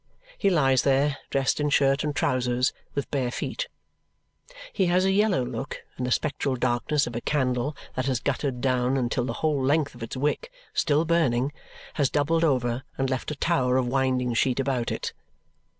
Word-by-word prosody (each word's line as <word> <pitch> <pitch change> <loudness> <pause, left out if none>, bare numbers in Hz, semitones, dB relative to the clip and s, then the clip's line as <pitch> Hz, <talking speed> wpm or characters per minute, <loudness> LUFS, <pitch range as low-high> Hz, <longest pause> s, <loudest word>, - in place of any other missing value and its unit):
He 200 - +2
lies 135 -7 +3
there, 140 +1 +2
dressed 135 +1 +1
in 150 0 +1
shirt 140 0 +3
and 150 -1 -2
trousers, 125 -4 +1 0.2
with 140 - -3
bare 130 -4 0
feet. - - -3 1.1
He 190 - +2
has 180 +2 +3
a 190 - +3
yellow 195 -9 +2
look 125 +3 -5
in 125 - -3
the 125 - -2
spectral 140 -1 0
darkness 130 +4 +1
of 120 - -6
a 120 - -2
candle 130 0 0 0.2
that 130 +1 -2
has 130 -3 +1
guttered 135 -2 -2
down 130 0 +1
until 120 -1 0
the 115 - -2
whole 145 -4 +1
length 145 +2 +2
of 120 - -14
its 115 +3 -5
wick 150 - -1 0.2
(still 155 0 +2
burning) 145 -6 +2 0.4
has 140 -4 +1
doubled 160 +3 +1
over 125 -5 +1 0.2
and 135 0 0
left 130 - -2
a 150 - -3
tower 130 -6 +1
of 130 - +2
winding 130 -1 +1
sheet 125 +2 +1
above 130 -3 0
it. - - -3
135 Hz, 180 wpm, -26 LUFS, 125-150 Hz, 1.1 s, lies